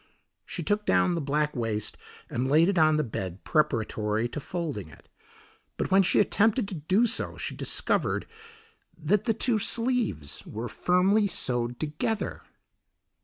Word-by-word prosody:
She -, -, -5 dB
took 210 Hz, 0 st, -1 dB
down 180 Hz, -, +3 dB
the 170 Hz, -, -1 dB
black 150 Hz, +1 st, 0 dB
waist 110 Hz, -3 st, -2 dB, 0.3 s
and 125 Hz, +2 st, -2 dB
laid 160 Hz, +5 st, +5 dB
it 190 Hz, -4 st, +1 dB
on 155 Hz, -1 st, +4 dB
the 155 Hz, -, +1 dB
bed 95 Hz, -, -5 dB
preparatory 115 Hz, -7 st, 0 dB
to 150 Hz, -, -5 dB
folding 145 Hz, -, -4 dB
it, -, -, -17 dB, 0.7 s
but -, -, -2 dB
when 195 Hz, +1 st, +6 dB
she 185 Hz, -, +3 dB
attempted 215 Hz, +2 st, +2 dB
to -, -, -6 dB
do 185 Hz, +8 st, +2 dB
so 240 Hz, +2 st, -1 dB
she -, -, -4 dB
discovered -, -, 0 dB, 0.7 s
that 175 Hz, +5 st, +1 dB
the 225 Hz, -, +2 dB
two 235 Hz, -1 st, +2 dB
sleeves 230 Hz, -, -1 dB
were 115 Hz, +3 st, -6 dB
firmly 190 Hz, -, +2 dB
sewed 120 Hz, -8 st, 0 dB
together. 155 Hz, +8 st, -3 dB
155 Hz, 150 wpm, -27 LUFS, 120-200 Hz, 0.7 s, when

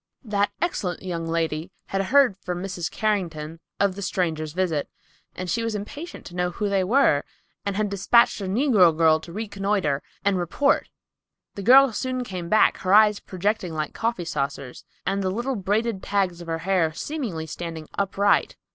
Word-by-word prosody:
That 205 Hz, -3 st, +1 dB
excellent 190 Hz, -, -2 dB
young 170 Hz, -3 st, -3 dB
lady 165 Hz, 0 st, -1 dB, 0.2 s
had 195 Hz, -, 0 dB
heard 260 Hz, -1 st, +4 dB
from 180 Hz, -2 st, -4 dB
Mrs. 180 Hz, -3 st, -3 dB
Carrington 165 Hz, -7 st, -2 dB, 0.2 s
of 200 Hz, -1 st, +2 dB
the 200 Hz, -, -8 dB
strangers' 160 Hz, -5 st, -2 dB
visit, 170 Hz, -5 st, -1 dB, 0.5 s
and 185 Hz, -, -5 dB
she 230 Hz, +6 st, 0 dB
was 230 Hz, -1 st, -2 dB
impatient 290 Hz, -, -7 dB
to 175 Hz, -, -10 dB
know 180 Hz, 0 st, 0 dB
who 205 Hz, +4 st, -2 dB
they 195 Hz, -1 st, +2 dB
were 205 Hz, -, +3 dB, 0.4 s
and 200 Hz, -, -1 dB
had 210 Hz, +1 st, +1 dB
dispatched 200 Hz, +3 st, +3 dB
a -, -, -3 dB
negro 195 Hz, -, +4 dB
girl 160 Hz, -1 st, +5 dB
to 170 Hz, -, -11 dB
reconnoiter 195 Hz, -7 st, -1 dB, 0.2 s
and 200 Hz, -2 st, +2 dB
report. 180 Hz, -, +1 dB, 0.6 s
The 200 Hz, -, -6 dB
girl 260 Hz, +4 st, +7 dB
soon 255 Hz, +3 st, -2 dB
came 185 Hz, -6 st, -6 dB
back, 215 Hz, -, +4 dB
her 190 Hz, +2 st, +2 dB
eyes 210 Hz, -1 st, +6 dB
projecting 185 Hz, -2 st, -2 dB
like 155 Hz, -1 st, -3 dB
coffee 225 Hz, -6 st, -2 dB
saucers, 140 Hz, -4 st, -4 dB, 0.2 s
and 195 Hz, +1 st, 0 dB
the 190 Hz, -, 0 dB
little 240 Hz, +7 st, -2 dB
braided 205 Hz, +1 st, -1 dB
tags 190 Hz, -4 st, -1 dB
of 170 Hz, -, -10 dB
her 165 Hz, 0 st, -1 dB
hair 185 Hz, -5 st, +2 dB
seemingly 220 Hz, -, -4 dB
standing 160 Hz, 0 st, -6 dB
upright. 200 Hz, +1 st, +1 dB
190 Hz, 175 wpm, -24 LUFS, 170-215 Hz, 0.6 s, girl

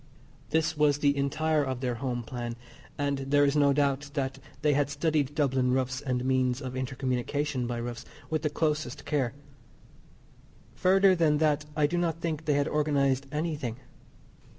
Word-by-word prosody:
This 160 Hz, +1 st, +1 dB
was 150 Hz, -1 st, +3 dB
the 145 Hz, -1 st, +2 dB
entire 150 Hz, +2 st, +1 dB
of 130 Hz, -2 st, -3 dB
their 125 Hz, -2 st, -1 dB
home 120 Hz, 0 st, -3 dB
plan, 120 Hz, 0 st, -5 dB, 0.4 s
and 140 Hz, -1 st, 0 dB
there 145 Hz, +1 st, +3 dB
is 140 Hz, +1 st, +1 dB
no 145 Hz, -1 st, +5 dB
doubt 140 Hz, 0 st, +1 dB
that 135 Hz, -2 st, -2 dB, 0.2 s
they 150 Hz, -1 st, +4 dB
had 145 Hz, 0 st, +1 dB
studied 145 Hz, -1 st, 0 dB
Dublin 130 Hz, -4 st, +2 dB
roofs 130 Hz, 0 st, -1 dB
and 125 Hz, -2 st, -2 dB
means 130 Hz, -1 st, +1 dB
of 130 Hz, -2 st, -6 dB
inter 130 Hz, +1 st, -3 dB
communication 130 Hz, +1 st, -1 dB
by 120 Hz, -1 st, -3 dB
roofs 120 Hz, 0 st, -5 dB, 0.2 s
with 155 Hz, -1 st, -1 dB
the 150 Hz, -, 0 dB
closest 150 Hz, -3 st, -2 dB
care. 135 Hz, -5 st, 0 dB, 1.4 s
Further 190 Hz, +7 st, +4 dB
than 160 Hz, -4 st, +3 dB
that 150 Hz, -1 st, +2 dB
I 150 Hz, -1 st, +3 dB
do 175 Hz, +4 st, 0 dB
not 165 Hz, -2 st, -1 dB
think 160 Hz, -2 st, -3 dB
they 150 Hz, -, +2 dB
had 145 Hz, +1 st, +1 dB
organised 140 Hz, -3 st, +1 dB
anything. 150 Hz, -6 st, -2 dB
140 Hz, 170 wpm, -28 LUFS, 130-150 Hz, 1.4 s, no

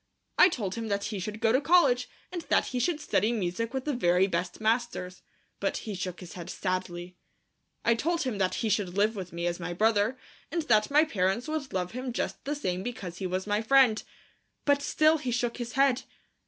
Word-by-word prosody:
I 365 Hz, -, +9 dB
told 205 Hz, -, -3 dB
him 230 Hz, -1 st, -4 dB
that 200 Hz, -1 st, -1 dB
he 210 Hz, -2 st, -3 dB
should 210 Hz, +3 st, -5 dB
go 225 Hz, -, +3 dB
to 260 Hz, +4 st, +3 dB
college 280 Hz, -6 st, +4 dB, 0.2 s
and 355 Hz, -2 st, -4 dB
that -, -, +4 dB
he 250 Hz, -, -2 dB
should 330 Hz, +3 st, 0 dB
study 220 Hz, -7 st, +1 dB
music 220 Hz, +1 st, -2 dB
with 265 Hz, -1 st, -3 dB
the 300 Hz, -, 0 dB
very 180 Hz, -6 st, +3 dB
best 180 Hz, -1 st, -2 dB
masters, 220 Hz, -5 st, -1 dB, 0.4 s
but -, -, -1 dB
he 215 Hz, -, -4 dB
shook 185 Hz, -1 st, -5 dB
his 180 Hz, -, -9 dB
head 175 Hz, -1 st, -8 dB
sadly. 180 Hz, -2 st, -3 dB, 0.7 s
I 230 Hz, -, +5 dB
told 330 Hz, +8 st, 0 dB
him 240 Hz, -6 st, -3 dB
that 185 Hz, -1 st, +1 dB
he -, -, +1 dB
should 200 Hz, -3 st, 0 dB
live 215 Hz, +2 st, +3 dB
with 185 Hz, -3 st, -6 dB
me 170 Hz, 0 st, -4 dB
as 175 Hz, 0 st, -1 dB
my 175 Hz, 0 st, -4 dB
brother, 220 Hz, +5 st, +2 dB, 0.3 s
and 330 Hz, +1 st, -1 dB
that 215 Hz, -6 st, +3 dB
my 295 Hz, +2 st, +5 dB
parents 205 Hz, -3 st, 0 dB
would 310 Hz, -3 st, -3 dB
love 180 Hz, -1 st, -2 dB
him 255 Hz, 0 st, -4 dB
just -, -, -3 dB
the 290 Hz, +2 st, -1 dB
same 185 Hz, -10 st, -2 dB
because 190 Hz, -6 st, -6 dB
he 190 Hz, -, -2 dB
was 185 Hz, +1 st, -2 dB
my 210 Hz, +1 st, 0 dB
friend. 245 Hz, -2 st, +5 dB, 0.6 s
But 285 Hz, -1 st, +3 dB
still 310 Hz, +2 st, +3 dB
he 260 Hz, -, -3 dB
shook 240 Hz, 0 st, -1 dB
his 240 Hz, -1 st, -5 dB
head. 270 Hz, -2 st, +3 dB
220 Hz, 215 wpm, -28 LUFS, 185-260 Hz, 0.7 s, I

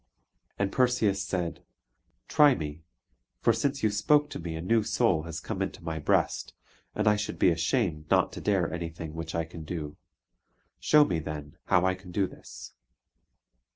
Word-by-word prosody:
And 100 Hz, -1 st, 0 dB
Perseus 120 Hz, -6 st, +2 dB
said, 90 Hz, -2 st, -3 dB, 0.7 s
"Try 145 Hz, -3 st, +5 dB
me; 75 Hz, -1 st, -6 dB, 0.6 s
for 115 Hz, -, +3 dB
since 135 Hz, +4 st, -1 dB
you 110 Hz, -, +3 dB
spoke 145 Hz, +8 st, +3 dB
to -, -, -5 dB
me 85 Hz, -1 st, -5 dB
a -, -, -4 dB
new 115 Hz, +6 st, +2 dB
soul 105 Hz, -6 st, +2 dB
has 80 Hz, -, -4 dB
come -, -, -5 dB
into -, -, -4 dB
my 80 Hz, -1 st, -3 dB
breast, 75 Hz, -, 0 dB, 0.4 s
and 105 Hz, 0 st, 0 dB
I 105 Hz, -, +6 dB
should 105 Hz, 0 st, -3 dB
be 90 Hz, -, +4 dB
ashamed 85 Hz, -3 st, 0 dB
not -, -, +3 dB
to -, -, -8 dB
dare 95 Hz, -5 st, +1 dB
anything 85 Hz, -2 st, -5 dB
which 80 Hz, 0 st, -5 dB
I 85 Hz, -, +1 dB
can 80 Hz, 0 st, -9 dB
do. 75 Hz, -2 st, -5 dB, 0.8 s
Show 150 Hz, -1 st, +5 dB
me, 85 Hz, -, -1 dB
then, 75 Hz, -2 st, -7 dB
how 90 Hz, 0 st, +3 dB
I 95 Hz, -, +3 dB
can 95 Hz, -1 st, -11 dB
do 95 Hz, +2 st, +1 dB
this!" -, -, -11 dB
90 Hz, 175 wpm, -28 LUFS, 80-105 Hz, 0.8 s, I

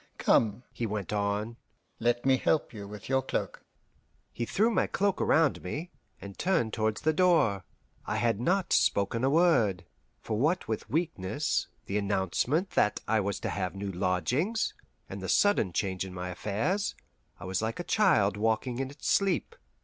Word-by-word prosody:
Come," 110 Hz, +1 st, +2 dB
he 115 Hz, -, -2 dB
went 105 Hz, -1 st, -4 dB
on, 105 Hz, +3 st, -1 dB, 0.4 s
"let 120 Hz, +1 st, +1 dB
me 135 Hz, -1 st, +5 dB
help 150 Hz, +1 st, 0 dB
you 100 Hz, -2 st, -7 dB
with 105 Hz, +1 st, -9 dB
your 135 Hz, 0 st, +2 dB
cloak." 135 Hz, -, -4 dB, 0.7 s
He 120 Hz, -, -3 dB
threw 220 Hz, +4 st, +2 dB
my 195 Hz, -, +2 dB
cloak 200 Hz, -1 st, 0 dB
around 160 Hz, -3 st, +3 dB
me, 150 Hz, -, -5 dB, 0.3 s
and 100 Hz, -1 st, -10 dB
turned 165 Hz, -, +1 dB
towards 110 Hz, -1 st, -1 dB
the 155 Hz, -, +2 dB
door. 155 Hz, -, +3 dB, 0.4 s
I -, -, -1 dB
had 115 Hz, -3 st, +1 dB
not 185 Hz, +7 st, +1 dB
spoken 110 Hz, +4 st, +2 dB
a 135 Hz, -, +4 dB
word, 135 Hz, -, +3 dB, 0.3 s
for 110 Hz, -1 st, -3 dB
what 160 Hz, +8 st, +1 dB
with 110 Hz, 0 st, -4 dB
weakness, 145 Hz, -, -1 dB, 0.2 s
the 100 Hz, +2 st, -1 dB
announcement 105 Hz, -, 0 dB
that 105 Hz, -, +1 dB
I 110 Hz, -, +2 dB
was 100 Hz, -1 st, -2 dB
to -, -, -2 dB
have 90 Hz, +1 st, -3 dB
new 100 Hz, 0 st, -4 dB
lodgings, 100 Hz, -, 0 dB, 0.3 s
and -, -, -7 dB
the -, -, -5 dB
sudden 205 Hz, -, +3 dB
change 95 Hz, +1 st, -1 dB
in 95 Hz, -1 st, -8 dB
my 90 Hz, 0 st, -4 dB
affairs, 110 Hz, -, -1 dB, 0.4 s
I 90 Hz, -, -8 dB
was 95 Hz, +1 st, -1 dB
like 110 Hz, +6 st, -3 dB
a -, -, -2 dB
child 105 Hz, -, +3 dB
walking 115 Hz, +3 st, 0 dB
in 135 Hz, 0 st, -2 dB
its 145 Hz, +1 st, -8 dB
sleep. 195 Hz, -, +1 dB
115 Hz, 170 wpm, -29 LUFS, 100-155 Hz, 0.7 s, me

